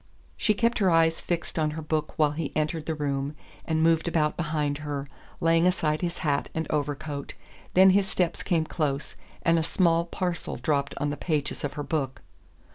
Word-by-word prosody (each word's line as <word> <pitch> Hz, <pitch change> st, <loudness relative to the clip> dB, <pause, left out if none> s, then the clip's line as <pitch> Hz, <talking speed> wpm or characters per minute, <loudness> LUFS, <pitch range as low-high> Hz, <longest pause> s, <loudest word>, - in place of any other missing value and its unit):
She 215 Hz, -, +2 dB
kept 230 Hz, +3 st, +1 dB
her 195 Hz, -3 st, +4 dB
eyes 165 Hz, -1 st, +4 dB
fixed 170 Hz, -1 st, -2 dB
on 155 Hz, -1 st, +1 dB
her -, -, -3 dB
book 155 Hz, 0 st, -2 dB
while 150 Hz, -2 st, +4 dB
he 150 Hz, 0 st, -3 dB
entered 155 Hz, +1 st, -1 dB
the 160 Hz, -, -1 dB
room 140 Hz, -1 st, -2 dB, 0.3 s
and 160 Hz, -1 st, +1 dB
moved 165 Hz, 0 st, +3 dB
about 155 Hz, -3 st, +1 dB
behind 150 Hz, -3 st, -1 dB
her, 145 Hz, -2 st, -4 dB, 0.3 s
laying 165 Hz, 0 st, +4 dB
aside 155 Hz, -4 st, +1 dB
his 175 Hz, -1 st, -2 dB
hat 140 Hz, -1 st, +1 dB
and 160 Hz, 0 st, -1 dB
overcoat; 145 Hz, -1 st, -3 dB, 0.4 s
then 190 Hz, +1 st, +8 dB
his 195 Hz, 0 st, +3 dB
steps 175 Hz, -3 st, 0 dB
came 165 Hz, -4 st, +1 dB
close 145 Hz, -4 st, -2 dB, 0.3 s
and 165 Hz, 0 st, +4 dB
a -, -, 0 dB
small 170 Hz, 0 st, +2 dB
parcel 175 Hz, 0 st, -3 dB
dropped 140 Hz, +2 st, 0 dB
on 145 Hz, +1 st, -1 dB
the 145 Hz, -, -4 dB
pages 150 Hz, -4 st, -2 dB
of 145 Hz, -, -2 dB
her 145 Hz, 0 st, -4 dB
book. 140 Hz, -3 st, -2 dB
160 Hz, 190 wpm, -27 LUFS, 145-170 Hz, 0.4 s, then